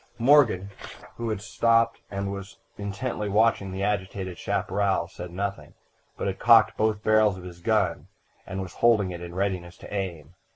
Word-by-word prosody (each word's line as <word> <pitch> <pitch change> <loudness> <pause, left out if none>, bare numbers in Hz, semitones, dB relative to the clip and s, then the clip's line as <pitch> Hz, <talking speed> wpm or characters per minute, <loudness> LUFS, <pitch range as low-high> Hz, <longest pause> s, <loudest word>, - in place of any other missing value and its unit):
"Morgan, 115 -7 +4 0.5
who 115 -1 -3
had 105 -2 -3
stopped 115 +3 +2
and 100 0 -3
was 100 0 -8 0.2
intently 105 +1 -4
watching 105 -2 +2
the 95 +1 -3
agitated 95 -2 -2
chaparral, 95 -3 0
said 90 +1 -8
nothing, 100 +3 -5 0.4
but - - -3
had - - -2
cocked - - +6
both 110 -1 0
barrels 110 -3 +4
of 90 - -10
his 90 -1 -10
gun, - - 0 0.4
and 95 +1 -4
was 90 - -9
holding 110 -5 +3
it 85 -1 -7
in 85 0 -8
readiness 95 -3 -2
to - - -11
aim. 90 -6 -4
100 Hz, 165 wpm, -26 LUFS, 95-110 Hz, 0.5 s, cocked